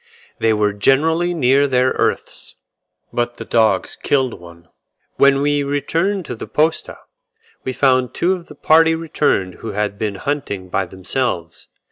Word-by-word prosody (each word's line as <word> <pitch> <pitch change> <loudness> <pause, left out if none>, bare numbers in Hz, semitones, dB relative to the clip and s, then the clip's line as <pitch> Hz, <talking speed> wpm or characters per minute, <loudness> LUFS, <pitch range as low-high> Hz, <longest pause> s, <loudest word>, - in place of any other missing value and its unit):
They 115 - +2
were 105 -1 +1
generally 160 +11 +2
near 140 -1 +3
their 130 -1 +2
earths, - - -2 0.6
but 120 0 -2
the - - -7
dogs 110 -4 +1
killed 130 -3 0
one. 85 -1 -15 0.5
When 140 0 +4
we 145 0 +1
returned 165 +7 -1
to - - -5
the 110 - -8
posta, 155 +9 0 0.7
we 130 - -2
found 130 -2 +2
two 180 +2 +2
of 180 -2 -7
the 150 - -12
party 160 +2 +4
returned 150 - 0
who 115 - -5
had 105 0 -2
been 105 -2 -2
hunting 100 -7 -4
by 95 0 -1
themselves. 95 -2 -3
130 Hz, 150 wpm, -19 LUFS, 105-145 Hz, 0.7 s, When